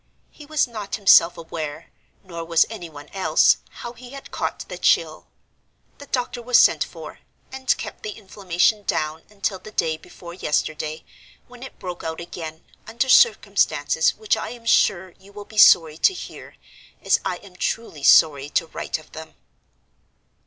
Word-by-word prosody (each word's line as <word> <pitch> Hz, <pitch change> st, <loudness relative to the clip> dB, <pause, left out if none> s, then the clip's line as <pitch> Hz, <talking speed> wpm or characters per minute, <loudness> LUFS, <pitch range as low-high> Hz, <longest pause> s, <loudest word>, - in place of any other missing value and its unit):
He 295 Hz, -, -14 dB
was 305 Hz, -3 st, +1 dB
not 210 Hz, -4 st, -5 dB
himself 180 Hz, -4 st, +5 dB
aware, 160 Hz, -3 st, -7 dB, 0.3 s
nor 170 Hz, -3 st, -7 dB
was 165 Hz, -1 st, +3 dB
any 180 Hz, -7 st, -7 dB
one 145 Hz, -2 st, -12 dB
else, 190 Hz, -1 st, +3 dB
how 235 Hz, -, -9 dB
he 245 Hz, +1 st, -13 dB
had 275 Hz, -, -11 dB
caught -, -, -4 dB
the -, -, -8 dB
chill. -, -, +1 dB, 0.7 s
The 285 Hz, -, -11 dB
doctor 245 Hz, -2 st, -3 dB
was 245 Hz, +1 st, +3 dB
sent -, -, +5 dB
for, -, -, -11 dB, 0.3 s
and 265 Hz, -1 st, 0 dB
kept -, -, -8 dB
the -, -, -5 dB
inflammation 195 Hz, 0 st, 0 dB
down 155 Hz, -4 st, -2 dB
until 200 Hz, -2 st, -3 dB
the 200 Hz, -, -12 dB
day 160 Hz, -6 st, -1 dB
before 170 Hz, +2 st, -12 dB
yesterday, 155 Hz, -2 st, -2 dB, 0.4 s
when 245 Hz, -1 st, -15 dB
it 265 Hz, -, -10 dB
broke 180 Hz, -2 st, -7 dB
out 160 Hz, 0 st, -5 dB
again, 165 Hz, -2 st, -8 dB, 0.2 s
under 235 Hz, +4 st, -2 dB
circumstances 485 Hz, -, +3 dB
which 435 Hz, -2 st, 0 dB
I -, -, -5 dB
am 235 Hz, -1 st, -11 dB
sure 190 Hz, -4 st, +2 dB
you 195 Hz, +1 st, -18 dB
will 205 Hz, 0 st, -10 dB
be 215 Hz, 0 st, -4 dB
sorry 160 Hz, -5 st, +6 dB
to 385 Hz, -, +4 dB
hear, -, -, -10 dB, 0.5 s
as -, -, +3 dB
I 185 Hz, -, -2 dB
am 190 Hz, -1 st, -17 dB
truly 180 Hz, -5 st, -4 dB
sorry 145 Hz, -1 st, +5 dB
to 165 Hz, -, 0 dB
write 160 Hz, -, -4 dB
of 155 Hz, -, -18 dB
them. 160 Hz, 0 st, -11 dB
190 Hz, 165 wpm, -22 LUFS, 160-235 Hz, 0.7 s, sorry